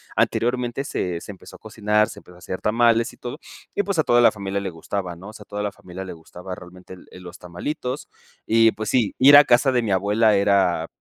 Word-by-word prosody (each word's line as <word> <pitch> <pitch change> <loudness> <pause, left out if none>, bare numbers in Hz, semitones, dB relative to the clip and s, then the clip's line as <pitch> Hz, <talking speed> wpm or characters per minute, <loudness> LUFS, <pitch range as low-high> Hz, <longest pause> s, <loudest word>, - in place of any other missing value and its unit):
anteriormente 125 +2 0
se 90 -10 -3
se 105 - -9
empezó 95 - -14
a - - -43
cocinar, 105 -1 0
se - - -10
empezó 90 - -18
a - - -16
hacer 90 +1 -6
tamales 115 +1 +2
y - - -19
todo, 125 +5 -7 0.4
y, 205 - +1
pues, 195 -4 -2
a - - +4
toda 120 0 +4
la 120 - +6
familia 100 -1 -4
le 100 - -4
gustaba, 90 +2 -5
¿no? 95 +3 -12
O - - -12
sea, 105 - -12
a - - -30
toda 105 0 -5
la 105 - -2
familia 95 +1 -9
le 95 - -7
gustaba 90 +3 -10
realmente 90 +1 -13
el 90 - -14
el 90 - -13
los 90 +1 -10
tamalitos. 125 - -5 0.4
Y, 115 0 +4
pues, 110 -1 -6
sí, 120 -6 +1
ir 140 +2 +8
a 145 - +10
casa 125 +1 +3
de 125 - +2
mi 110 - -2
abuela 105 +3 +2
era 95 -5 +2
105 Hz, 245 wpm, -22 LUFS, 90-120 Hz, 0.4 s, a